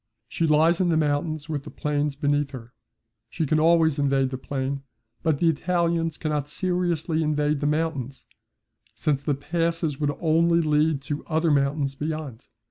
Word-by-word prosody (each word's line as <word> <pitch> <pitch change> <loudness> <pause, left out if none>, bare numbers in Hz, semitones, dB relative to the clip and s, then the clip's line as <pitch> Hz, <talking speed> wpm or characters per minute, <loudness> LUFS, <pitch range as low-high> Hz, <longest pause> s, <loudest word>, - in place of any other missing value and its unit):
She 165 - -1
lies 160 +3 +4
in 180 - +2
the 160 - +2
mountains 155 0 -1
with 150 -3 -3
the - - -10
plains 145 -1 -1
beneath 145 0 0
her. 125 -3 -10 0.6
She 160 +5 -2
can 155 +2 +2
always 160 -2 +4
invade 135 -2 +1
the 130 - -3
plain, 135 0 -3 0.4
but 160 -3 +1
the 170 - +2
Italians 165 0 0
cannot 150 -2 -2
seriously 175 -2 -1
invade 150 -1 +1
the 145 - 0
mountains, 150 -4 -2 0.7
since 140 +2 0
the 145 -1 0
passes 165 0 -1
would 145 -2 -1
only 170 +1 +3
lead 150 -2 +1
to 145 0 -4
other 160 0 +1
mountains 140 0 +1
beyond. 150 -4 -5
150 Hz, 160 wpm, -25 LUFS, 145-165 Hz, 0.7 s, lies